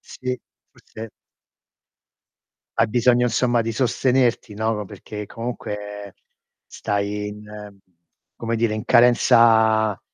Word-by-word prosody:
Sì, 125 -1 -6 0.3
forse 110 0 -11 1.7
hai 115 - +4
bisogno 125 +1 +3
insomma 120 0 +1
di 115 - -3
sostenerti, 125 -1 0
no, 110 +2 -1
vo 105 -1 -4
perché 105 +2 -9
comunque 105 -4 -7 0.5
stai 105 0 -3
in 105 -1 -11 0.6
come 115 0 -3
dire, 115 -1 0
in 110 - -5
carenza 115 -3 +4
110 Hz, 100 wpm, -22 LUFS, 105-120 Hz, 1.7 s, hai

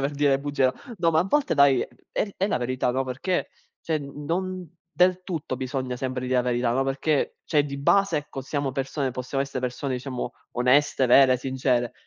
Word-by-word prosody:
saper 140 +1 0
dire 145 0 +2
le 135 - +3
bugie, 145 -2 0
no 130 - +4 0.2
no 170 -3 +2
ma 160 - +2
a - - +1
volte 295 +9 +1
dai, 140 -2 +5
è - - -7 0.2
è 200 - -2
è 195 - +1
la - - +1
verità, 125 0 -1
no, 130 +1 -1
perché 145 +9 -2 0.3
cioè 160 -2 0
n 145 +1 -8
non 185 +3 -2 0.2
del 180 +1 +2
tutto 160 -8 -4
bisogna 130 -1 -3
sempre 130 0 -3
dire 130 0 -1
la 125 - +5
verità, 120 -1 0
no, 135 +2 +1
perché 140 +2 0
c'è 150 -2 +2
di 140 -1 -5
base, 195 +5 +3
ecco, 145 -2 -5
siamo 140 0 -2
persone 135 +1 -2
possiamo 130 +2 -2
essere 135 -2 -5
persone 130 +2 -3
diciamo 125 -1 -4 0.2
oneste, 130 +2 +3
vere, 130 +1 +6
sincere, 125 -2 0
135 Hz, 210 wpm, -25 LUFS, 130-150 Hz, 0.3 s, vere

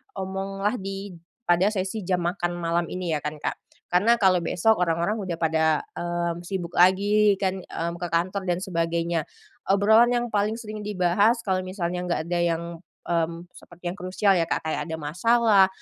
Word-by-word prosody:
omonglah 195 +2 -2
di 195 +1 -6 0.4
pada 175 +2 +4
sesi 195 +1 -3
jam 180 -2 +1
makan 175 0 -1
malam 170 0 0
ini, 180 -2 -3
ya - - -1
kan, 150 +1 -3
Kak. - - -2 0.4
Karena 205 +7 +4
kalau 185 -4 +4
besok 220 +6 +2
orang-orang 175 +5 0
udah 185 -4 -3
pada, 160 -1 +1 0.3
mmm, 175 0 -2
sibuk 175 -3 -4
lagi 200 +3 +5
kan, 190 -1 0
mmm, 170 +1 -4
ke 175 - -3
kantor 185 +4 0
dan 175 0 +1
sebagainya. 170 -2 -1 0.5
Obrolan 220 +4 +5
yang 240 0 0
paling 210 0 +1
sering 215 -2 -7
dibahas 205 +4 +2
kalau 190 -2 0
misalnya 180 -1 -3
nggak 170 - 0
ada 175 0 0
yang 170 -1 0 0.4
mmm, 170 0 -1
seperti 175 0 -10
yang - - -8
krusial 190 +2 +2
ya, 170 - +2
Kak, - - -2
kayak 155 - -1
ada - - -1
masalah 200 +6 +4
185 Hz, 170 wpm, -25 LUFS, 170-200 Hz, 0.5 s, lagi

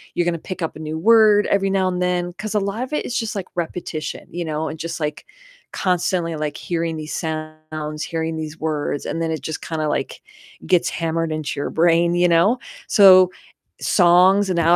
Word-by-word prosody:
you're 175 - +1
gonna 175 -1 0
pick 185 -1 -5
up 160 - -3
a 155 - -9
new 155 0 -4
word 215 0 +5
every 195 -1 +1
now 190 -1 +2
and 180 0 -2
then, 175 -1 -1
'cause 210 +4 -6
a - - +4
lot 200 +5 -2
of 260 - -7
it - - 0
is 245 - -2
just 225 -4 -3
like 190 -2 -4
repetition, 170 -2 -4
you 175 -1 -4
know, 155 0 -2
and 160 - -7
just, 165 0 -5
like, 150 -1 -4 0.5
constantly, 180 -2 0
like, 150 -1 -3
hearing 165 -2 -3
these 155 0 -5
sounds, 155 -1 -5
hearing 160 -1 -3
these 155 0 -6
words, 150 -2 -2
and 165 - -3
then 160 - -1
it 160 - -3
just 160 - -5
kinda, 155 -2 -2
like, - - -3 0.5
gets 180 -1 +3
hammered 165 -1 -2
into 155 -2 -3
your - - -3
brain, 170 +1 +3
you 175 0 +4
know? 175 +9 +3 0.3
So 185 -3 +7 0.5
songs 185 +2 +4
and 175 - -1
now 170 +1 +4
170 Hz, 205 wpm, -21 LUFS, 155-185 Hz, 0.5 s, So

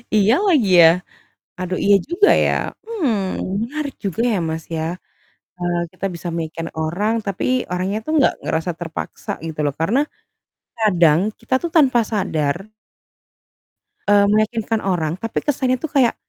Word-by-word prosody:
Iya 210 +1 +4
lagi 275 - +3
ya? 165 - +9 0.7
Aduh, 185 0 -2
iya 200 0 +6
juga 410 +4 +4 0.2
ya. - - +2 0.3
Hmm, 330 - 0 0.5
menarik 285 +3 -4
juga 195 +4 -1
ya, 205 - +1
Mas, 160 0 -4
ya. 160 - -2 0.7
Eee, 175 -1 -1 0.2
kita 185 - -5
bisa 170 +1 -7
meyakinkan 165 0 -4
orang, 195 +8 0
tapi 195 -2 -2 0.3
orangnya 185 +3 -1
tuh - - -3
nggak - - +4
ngerasa 160 +2 -1
terpaksa 165 -2 -6 0.2
gitu 155 -1 -7
loh. 145 - 0
Karena 225 +11 +2 0.8
kadang 175 -7 +4 0.2
kita - - -2
tuh 340 - -2
tanpa 260 -6 +5
sadar 160 -7 0 1.5
eee, 205 0 +5
meyakinkan 215 +1 +1
orang 170 -4 0
tapi 225 +4 -3
kesannya 260 -3 0
itu 320 - -3
kayak, 270 -5 +2
200 Hz, 145 wpm, -20 LUFS, 170-240 Hz, 1.5 s, ya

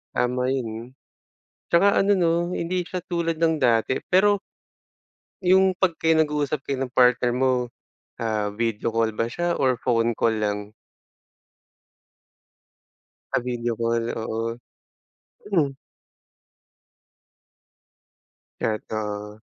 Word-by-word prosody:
Tama 125 +1 0
yun, 120 -2 -4 0.8
tsaka 195 +4 +5
ano 200 +1 +2
'no, 170 -2 +3 0.3
hindi 180 +2 -1
siya 180 0 -6
tulad 170 -2 -1
ng 160 -1 +1
dati. 115 +2 +2
Pero 200 +2 +4 1.0
Yung 190 +1 +4
'pag 180 -2 0
kayo 160 0 +3
nag-uusap 150 -1 -1
kayo 140 -1 -3
ng 125 - -13
partner 125 -1 +4
mo, 125 -1 0 0.4
ah, 110 -2 -1
video 115 -1 -1
call 115 -1 0
ba 115 +2 -1
siya 175 +7 -1
or 130 -2 +3
phone 115 -2 +1
call 115 - +2
lang? 105 -1 -2 2.6
Sa - - +3
video 120 -2 -3
call, 115 0 0
oo. 115 +1 -3 0.9
Mm. 145 -7 +2 2.9
Totoo. 105 -1 -3
125 Hz, 105 wpm, -24 LUFS, 115-165 Hz, 2.9 s, tsaka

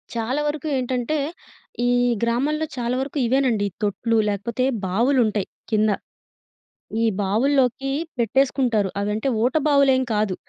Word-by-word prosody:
చాలా 250 +6 -1
వరకు 300 +1 -3
ఏంటంటే, 255 +3 -1 0.7
ఈ - - +3 0.3
గ్రామాల్లో 285 +7 0
చాలా 240 +1 -1
వరకు 280 +2 -5
ఇవేనండి. 245 -4 +2
ఈ - - -23
తొట్లు, 225 +3 0
లేకపోతే 235 +5 -1 0.2
బావులుంటయి 220 -1 +1 0.2
కింద. 215 0 +3 1.1
ఈ - - +3 0.2
బావుల్లోకీ 265 +5 +1 0.3
పెట్టేసుకుంటారు. 240 -4 +2
అవంటే 210 +5 -1 0.2
ఊట 255 - +2
బావులేం 275 -3 +4
కాదు. 210 -3 0
245 Hz, 115 wpm, -22 LUFS, 215-270 Hz, 1.1 s, బావులేం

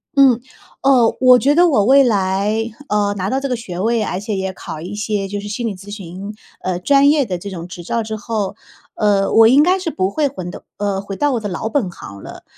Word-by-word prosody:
嗯。 270 -4 +5 0.4
哦， 255 -4 +4
我 255 -1 +7
觉 280 +3 +2
得 350 +3 +5
我 215 -10 +3
未 275 +4 +6
来， 205 0 0 0.2
嗯， 205 -1 +1
拿 190 -1 -2
到 265 - 0
这 275 - -3
个 250 - -1
学 185 -7 -7
位， 225 +3 +1
而 185 - -3
且 210 +1 -4
也 190 0 -2
考 160 -4 -8
一 185 +4 -6
些 210 -1 -2
就 205 +1 -4
是 205 - -7
心 230 +3 -3
理 205 - -4
咨 195 +2 -12
询， 195 +1 -8 0.3
呃， 185 -1 -2
专 280 +8 +4
业 300 -2 +3
的 185 -7 -3
这 200 +3 -8
种 175 -2 -7
执 175 -1 -9
照 230 +7 -1
之 220 0 -4
后， 210 -2 -3 0.4
呃， 200 -2 +1
我 225 0 +7
应 265 +5 +6
该 365 +4 +3
是 365 -3 -3
不 185 -6 -1
会 290 +8 0
回到 185 -10 -7
呃， 200 -2 -1
回 200 0 -6
到 290 +5 +1
我 240 - 0
的 215 - -4
老 200 +3 -4
本 225 -7 -1
行 100 -11 -11
了。 - - -10
210 Hz, 260 characters per minute, -18 LUFS, 190-250 Hz, 0.4 s, 我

